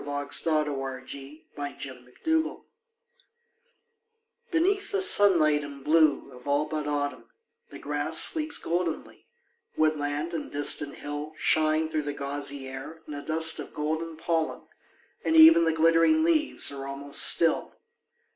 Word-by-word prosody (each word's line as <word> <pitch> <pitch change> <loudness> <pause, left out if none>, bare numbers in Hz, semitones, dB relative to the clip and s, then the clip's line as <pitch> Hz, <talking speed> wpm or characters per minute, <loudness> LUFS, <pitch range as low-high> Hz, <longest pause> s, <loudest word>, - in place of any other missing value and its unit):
On - - -12
Hampstead 145 +2 -1
Heath 135 +1 -7
21 - - -29
ON 145 - -2
HAMPSTEAD 135 - -3
HEATH - - -8 1.9
BENEATH 390 +4 0
the 400 - 0
sunlight 170 - +4
and 140 -1 -10
blue 155 -1 +2
of 125 +2 -14
ail 145 +1 +1
but 150 -1 -4
Autumn 145 -2 -3 0.4
The - - -10
grass - - -2
sleeps 310 -2 +2
goldenly; 170 -1 -4 0.5
woodland 155 +1 -1
and 160 - -5
distant 145 0 +2
hill 145 +1 -7
Shine 155 0 +1
through 155 -1 -2
the 145 0 -5
gauzy 140 -1 -3
air 135 +5 -9
in 150 - -7
a 145 - -6
dust 160 0 +1
of - - -9
golden 160 +2 -3
pollen, 165 -1 -2 0.6
And 320 - 0
even 320 - +8
the 165 - +2
glittering 165 - +3
leaves 315 - +1
are 135 -1 -7
almost 140 +1 -1
still. 165 - +2
155 Hz, 140 wpm, -27 LUFS, 145-165 Hz, 1.9 s, even